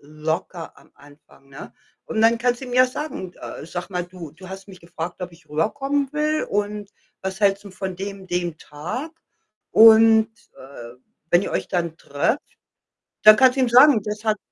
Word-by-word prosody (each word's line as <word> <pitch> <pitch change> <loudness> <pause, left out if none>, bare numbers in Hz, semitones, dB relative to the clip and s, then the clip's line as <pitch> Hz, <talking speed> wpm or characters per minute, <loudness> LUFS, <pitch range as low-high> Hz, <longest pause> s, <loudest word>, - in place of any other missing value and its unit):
locker 160 +3 -5
am - - -22
Anfang, 145 -1 -21
ne? 135 - -11 0.3
Und 220 - -2
dann 230 +1 +4
kannst 245 +1 -1
ihm 250 -2 -7
ja 255 +1 +5
sagen: 255 - -6
„Äh, - - -9
sag 175 +3 -6
mal, 180 -2 -3
du 180 -3 -11
du 185 +5 -14
hast 190 0 -9
mich 185 -3 -13
gefragt, 170 +1 -7
ob 180 -1 -6
ich 170 0 -20
rüberkommen 275 - -1
will 305 +1 0
und 205 0 -3 0.3
was 190 +2 -5
hältst 200 0 +2
'n 200 - -11
von 190 -1 -6
dem 195 0 -7
dem 175 -2 -3
Tag?“ 180 - -7 0.6
Und, 225 0 +7 0.3
äh, 120 -3 -12 0.4
wenn 175 +2 +4
ihr - - -4
euch - - -2
dann 170 -3 -2
trefft, 145 - -1 0.8
dann 215 0 +9
kannst 260 +2 +4
du - - +1
ihm 255 - +2
sagen, 255 0 +6
das 210 +1 -6
hat 215 -1 +1
195 Hz, 180 wpm, -22 LUFS, 170-230 Hz, 0.8 s, dann